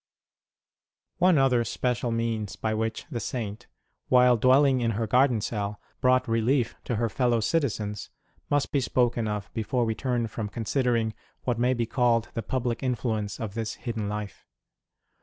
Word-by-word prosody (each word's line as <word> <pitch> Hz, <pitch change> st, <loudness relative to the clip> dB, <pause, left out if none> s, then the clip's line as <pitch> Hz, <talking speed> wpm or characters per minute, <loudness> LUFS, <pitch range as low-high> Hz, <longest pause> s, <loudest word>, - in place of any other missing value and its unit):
One 180 Hz, -2 st, +5 dB
other 130 Hz, -3 st, +3 dB
special 125 Hz, 0 st, -1 dB
means 115 Hz, -3 st, -2 dB
by 110 Hz, -1 st, -2 dB
which 110 Hz, 0 st, -2 dB
the 120 Hz, -, -2 dB
Saint, 110 Hz, 0 st, -5 dB, 0.4 s
while 125 Hz, -1 st, +6 dB
dwelling 130 Hz, +2 st, +4 dB
in 115 Hz, -3 st, 0 dB
her 115 Hz, -, 0 dB
garden 125 Hz, 0 st, +3 dB
cell, 105 Hz, -2 st, -3 dB, 0.2 s
brought 130 Hz, +1 st, +3 dB
relief 115 Hz, +2 st, +1 dB
to 120 Hz, -, -1 dB
her 115 Hz, +2 st, +1 dB
fellow 120 Hz, +2 st, +1 dB
citizens 110 Hz, -6 st, -1 dB, 0.4 s
must 145 Hz, -1 st, +1 dB
be 140 Hz, -, +2 dB
spoken 120 Hz, -3 st, +1 dB
of 105 Hz, -1 st, -4 dB
before 115 Hz, +2 st, 0 dB
we 110 Hz, -, 0 dB
turn 120 Hz, +1 st, -1 dB
from 110 Hz, -1 st, -4 dB
considering 115 Hz, 0 st, 0 dB, 0.3 s
what 120 Hz, -2 st, -1 dB
may 125 Hz, +2 st, +2 dB
be 120 Hz, -1 st, 0 dB
called 115 Hz, -1 st, +1 dB
the 115 Hz, -, -2 dB
public 125 Hz, -1 st, -2 dB
influence 110 Hz, -5 st, -2 dB
of 110 Hz, -3 st, -4 dB
this 110 Hz, 0 st, -3 dB
hidden 115 Hz, -4 st, -4 dB
life. 105 Hz, -1 st, -6 dB
115 Hz, 160 wpm, -27 LUFS, 110-125 Hz, 0.4 s, while